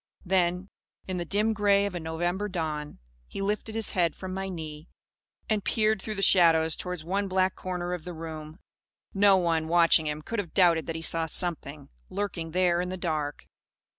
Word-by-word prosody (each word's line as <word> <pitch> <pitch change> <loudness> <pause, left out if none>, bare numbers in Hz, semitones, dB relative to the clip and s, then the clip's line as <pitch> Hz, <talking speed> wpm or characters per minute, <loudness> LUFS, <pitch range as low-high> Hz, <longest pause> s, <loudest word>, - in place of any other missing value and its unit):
Then, 180 0 +1 0.4
in 185 -1 -3
the 175 - -3
dim 210 +5 +1
grey 200 -1 +3
of 200 - -3
a 175 - -3
November 175 +5 -2
dawn, 155 -5 -4 0.3
he - - -7
lifted 210 +2 -2
his 225 -2 -1
head 170 -3 +1
from 185 -1 -6
my 195 0 -3
knee, 155 -3 -7 0.6
and 215 -3 0
peered 215 -2 +1
through 215 +1 -4
the 195 - -2
shadows 165 -4 +5
towards 180 -3 -5
one 195 +4 -1
black 185 0 +1
corner 180 -1 -4
of 175 -3 -5
the 175 0 -7
room. 160 -1 -7 0.6
No 195 -1 +5
one, 165 -3 +1
watching 165 -1 +4
him, 150 0 -4
could 230 +5 -3
have 180 -5 -5
doubted 170 -5 +4
that 165 - -3
he 165 - -5
saw 165 0 +1
Something 150 -4 -1 0.2
lurking 185 -4 -3
there 175 0 +2
in 180 - -3
the 185 - -4
dark. 155 -5 -3
180 Hz, 190 wpm, -27 LUFS, 160-195 Hz, 0.6 s, shadows